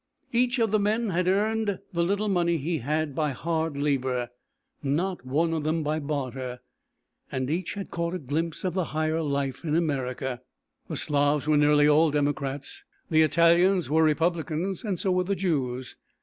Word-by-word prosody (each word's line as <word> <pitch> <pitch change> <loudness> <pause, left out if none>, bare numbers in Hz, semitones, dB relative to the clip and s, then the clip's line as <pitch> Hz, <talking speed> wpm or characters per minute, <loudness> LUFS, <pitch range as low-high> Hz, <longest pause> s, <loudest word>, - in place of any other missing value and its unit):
Each 245 +2 +2
of 225 -3 +1
the 215 - +3
men 215 +2 +1
had 180 +1 0
earned 210 +1 +1 0.2
the 170 0 +1
little 200 +4 0
money 170 -3 +2
he 160 +2 -2
had, 150 +3 -1
by 150 0 0
hard 160 +1 -2
labour; 130 -4 0 0.5
not 170 +4 -1
one 160 +5 +1
of 160 -2 -1
them 155 +1 0
by 155 +1 -1
barter, 130 -4 -4 0.7
and 130 +1 -2
each 180 +5 -2
had 200 -1 -6
caught 170 +1 -2
a - - 0
glimpse 160 +2 -3
of 185 -3 -1
the 185 -2 0
higher 155 +1 +1
life 140 -2 -2
in 155 -2 0
America. 130 -5 -1 0.5
The - - -4
Slavs 145 0 +1
were 155 0 +3
nearly 145 0 +5
all 155 +2 +5
Democrats, 145 -1 -2 0.3
the 160 0 +5
Italians 170 +1 +4
were 160 +1 +4
Republicans, 165 +3 0
and 200 -5 -2
so 190 - 0
were 180 0 +2
the 200 +2 -1
Jews. 130 -9 -2
160 Hz, 175 wpm, -26 LUFS, 145-180 Hz, 0.7 s, nearly